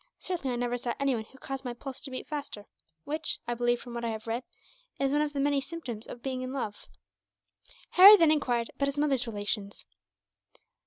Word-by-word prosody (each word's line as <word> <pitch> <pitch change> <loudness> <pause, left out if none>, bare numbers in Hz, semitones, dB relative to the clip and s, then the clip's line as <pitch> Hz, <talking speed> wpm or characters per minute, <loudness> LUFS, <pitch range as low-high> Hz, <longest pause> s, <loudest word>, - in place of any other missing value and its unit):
Certainly 335 -8 -3
I 245 - -2
never 245 0 -1
saw 240 0 -3
anyone 260 -6 0
who 265 - -18
caused 270 0 -5
my 245 -2 -4
pulse 265 +1 -8
to 275 - -6
beat 255 - -5
faster; 285 -9 -6 0.4
which 310 +2 -2
I 240 - 0
believe, 240 0 +1
from 245 - -9
what 235 0 -4
I 230 - 0
have 220 0 -5
read, 230 +2 -2 0.6
is 275 -1 +1
one 295 +1 +2
of 300 -1 -1
the 280 - -2
many 285 0 +2
symptoms 265 -7 -7
of 240 - -9
being 260 -1 -2
in 255 0 -4
love." 220 -6 -5 1.0
Harry 395 +3 +11
then 330 -4 +5
enquired 245 -6 +1
about 280 - 0
his 280 +1 -3
mother's 280 -5 +2
relations. 205 -1 -3
255 Hz, 205 wpm, -29 LUFS, 235-285 Hz, 1.0 s, Harry